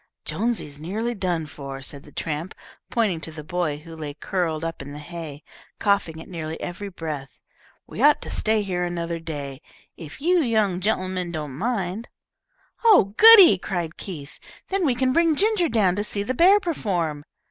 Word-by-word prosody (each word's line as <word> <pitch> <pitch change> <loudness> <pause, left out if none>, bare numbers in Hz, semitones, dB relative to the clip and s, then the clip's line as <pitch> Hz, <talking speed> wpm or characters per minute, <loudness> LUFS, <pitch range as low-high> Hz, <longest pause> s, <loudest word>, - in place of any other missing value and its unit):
"Jonesy's 215 -11 -2
nearly 215 +9 -2
done 180 -6 -1
for," 140 -2 -8
said 140 +1 -7
the 145 - -16
tramp, 160 +4 -4 0.3
pointing 205 -8 0
to 160 - -6
the 155 -1 -8
boy 175 -2 -2
who 165 +2 -11
lay 150 -3 -6
curled 165 -1 -2
up 165 -3 -4
in 140 +1 -8
the - - -7
hay, 155 -2 -8 0.3
coughing 200 -6 +1
at - - -10
nearly 160 -3 -5
every 190 +3 -5
breath. 155 -6 -6 0.5
"We - - -7
ought 295 +1 +6
to - - -7
stay 215 -1 +1
here 180 -2 -2
another 170 -1 -3
day, 145 -4 -6 0.4
if 160 -3 -10
you 350 +5 +3
young 215 - +1
gen'lemen 185 -3 -1
don't 150 -2 -5
object." 220 -2 -2 0.8
"Oh, 390 - +6
goody!" 405 - +9
cried 175 -4 -3
Keith. 150 -7 -8 0.3
"Then 385 -4 +1
we 255 - +2
can 255 +1 +1
bring 335 0 +3
Ginger 405 -2 +2
down 195 -6 +2
to 205 - 0
see 205 -1 -2
the 255 - -2
bear 370 +9 +6
perform." 180 - -2
180 Hz, 175 wpm, -24 LUFS, 155-225 Hz, 0.8 s, goody